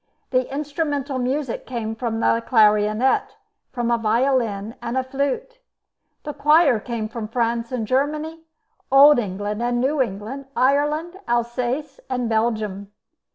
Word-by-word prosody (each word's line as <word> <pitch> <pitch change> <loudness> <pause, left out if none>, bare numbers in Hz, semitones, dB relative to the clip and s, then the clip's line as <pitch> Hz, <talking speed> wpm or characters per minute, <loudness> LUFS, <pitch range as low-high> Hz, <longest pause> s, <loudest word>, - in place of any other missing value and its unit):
The 255 -1 +1
instrumental 285 -1 -2
music 260 0 -2
came 230 -3 -3
from 225 -1 -3
the 230 - +2
clarionet, 215 +2 +3 0.4
from 240 -2 -1
a 235 - +2
violin, 225 -2 0
and 235 +2 -3
a 260 - +1
flute. 280 - -3 0.6
The 295 - -5
choir 300 -5 +4
came 225 -1 -4
from 225 -1 -6
France 230 +1 -1
and 245 -4 -2
Germany, 300 +6 -1 0.5
Old 280 +1 +8
England 205 +1 -3
and 240 0 0
New 275 +3 +1
England, 230 +5 -4
Ireland, 295 +7 +1
Alsace, 240 +4 -2
and 250 -2 -1
Belgium. 215 -3 -1
245 Hz, 130 wpm, -22 LUFS, 225-280 Hz, 0.6 s, Old